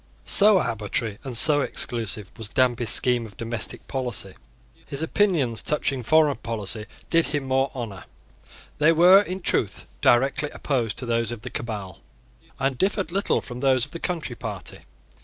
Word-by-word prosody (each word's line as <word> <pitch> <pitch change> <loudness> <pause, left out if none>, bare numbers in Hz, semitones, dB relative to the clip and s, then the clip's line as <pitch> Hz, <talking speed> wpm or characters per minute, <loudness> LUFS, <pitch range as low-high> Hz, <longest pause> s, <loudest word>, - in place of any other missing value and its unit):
So 205 0 +7
arbitrary 110 - -2
and 130 -4 -2
so 145 +4 +4
exclusive 110 -7 -2
was 110 -2 -6
Danby's 120 -2 +1
scheme 120 0 +2
of 100 - -17
domestic 115 0 -4
policy. 125 -8 -4 0.5
His 140 +3 -2
opinions 160 - +1
touching 140 -3 0
foreign 150 +3 +3
policy 110 -1 -3 0.2
did 165 -1 +3
him 145 -1 -2
more 135 +1 +1
honour. 110 -7 -6 0.7
They 155 +2 +5
were 180 +4 +7
in 190 -1 -5
truth 105 - -1 0.2
directly 135 +4 +2
opposed 120 -7 -2
to 125 - -3
those 115 -1 -1
of 120 -3 -7
the - - -7
Cabal 100 -6 -6 0.6
and 135 -1 -1
differed 195 -1 0
little 195 +2 0
from 120 -1 -8
those 130 -2 +2
of 145 - -18
the 170 - -7
Country 165 -9 -3
Party. 105 -5 -7
125 Hz, 160 wpm, -24 LUFS, 115-150 Hz, 0.7 s, So